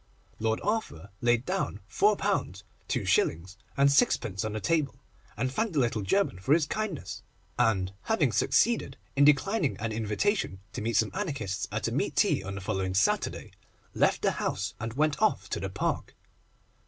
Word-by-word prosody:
Lord 110 0 0
Arthur 185 - -2
laid 120 0 +2
down 185 - -2
£4, 210 0 +3 0.7
2s. 90 +4 +1 0.2
6d. 140 - +3
on 105 - -5
the 110 - -2
table, 145 +6 0 0.4
thanked 130 - -1
the 150 - +2
little 115 -4 +1
German 145 - +1
for 135 +11 +3
his 165 -3 +2
kindness, 210 - -4 0.4
and, 95 -6 +2
having 170 - +2
succeeded 230 - +2 0.2
in 140 +1 +5
declining 150 - +3
an 115 0 -3
invitation 110 - -1
to 120 - -4
meet 115 +1 -1
some 110 0 +2
Anarchists 135 - -3
at - - -1
a - - -2
meat - - -1
tea - - +3
on 100 +1 -6
the 100 - -5
following 95 0 -2
Saturday, 100 +3 +1 0.4
left - - +2
the - - +3
house - - -2
and 115 0 -4
went 150 - +1
off 215 - +2
to - - -1
the - - -3
Park. - - -2
120 Hz, 160 wpm, -28 LUFS, 105-165 Hz, 0.7 s, in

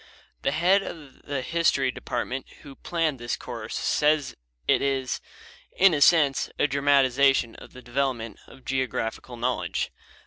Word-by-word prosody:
The - - +1
head 180 +6 +3
of 150 -8 -9
the 140 -3 -2
history 140 -4 +2
department 130 +1 -4 0.2
who 140 - -10
planned 160 -2 -2
this 120 0 -3
course 115 -3 -7
says 150 -2 +1 0.3
it - - +4
is 135 -2 -1 0.6
"in 195 -2 +6
a 145 - 0
sense 145 -3 +4
a - - +3
dramatization 140 -3 +3
of - - -13
the 125 - -12
development 120 -2 -2
of 130 - -16
geographical 125 -2 -3
knowledge." 125 +2 -1
135 Hz, 140 wpm, -26 LUFS, 125-150 Hz, 0.6 s, in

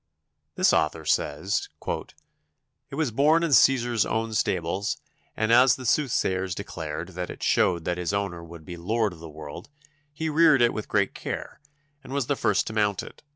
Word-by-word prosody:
This - - +3
author - - +1
says: - - 0 1.2
"It - - -7
was 155 -4 0
born 150 +8 +3
in 165 - 0
Cæsar's 120 -3 +4
own 110 0 -2
stables, 95 -1 -1 0.4
and 110 +1 +1
as 125 +1 +6
the 130 - -9
soothsayers 95 - +1
declared 80 -5 -5
that 90 -1 -5
it - - -8
showed 85 -3 +2
that 90 0 -1
its 90 0 -1
owner 100 -4 -2
would 85 -1 -12
be 90 -1 -7
lord 105 +3 0
of 85 - -14
the 80 0 -9
world, 75 - -9 0.4
he 160 +2 -4
reared 155 -4 +5
it 120 - +3
with 110 - -5
great - - +1
care, - - -6 0.4
and 135 - -9
was 140 -3 0
the 145 - 0
first 100 -6 +1
to 110 - -5
mount 105 -3 +1
it. - - -12
105 Hz, 180 wpm, -26 LUFS, 90-130 Hz, 1.2 s, as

